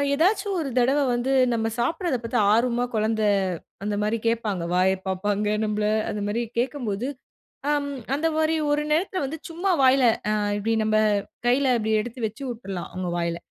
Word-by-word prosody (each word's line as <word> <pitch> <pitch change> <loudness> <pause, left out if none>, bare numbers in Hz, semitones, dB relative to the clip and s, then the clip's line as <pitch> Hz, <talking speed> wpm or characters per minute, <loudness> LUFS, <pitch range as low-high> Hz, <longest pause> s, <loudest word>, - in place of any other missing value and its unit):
ஏதாச்சும் 385 +4 +1
ஒரு 280 - -3
தடவ 265 +4 +3 0.2
வந்து 250 +3 0 0.2
நம்ம 225 -1 0
சாப்பிடுறத 325 - 0
பாத்து 230 0 0
ஆர்வமா 240 +1 +2
குழந்தை 215 0 +1 0.6
அந்த 210 0 -1
மாரி 220 +2 0
கேப்பாங்க, 215 -6 -1
வாய 185 +1 +4 0.2
பாப்பாங்க 205 +2 0 0.2
நம்பள, 210 0 -1 0.3
அந்த 210 -1 -4
மாரி 230 +3 -1 0.2
கேக்கும்போது, 245 -4 -2 0.6
அம் 290 -1 0 0.2
அந்த 300 +3 0
மாரி 315 0 +2 0.2
ஒரு 295 +1 +1
நேரத்தில 370 +3 0
வந்து 315 +4 -6
சும்மா 350 +4 -1
வாயில 260 0 +5 0.3
அ - - +2 0.3
இப்டி 220 +2 -1
நம்ப 215 0 +2 0.5
கைல 255 0 +3
இப்டி 220 0 -2
எடுத்து 240 +1 -8
வச்சு 225 +6 -8
உட்ரடலாம் 195 -7 -6
அவங்க 185 -1 -3
வாயில. 170 0 -1
235 Hz, 160 wpm, -24 LUFS, 210-280 Hz, 0.6 s, வாயில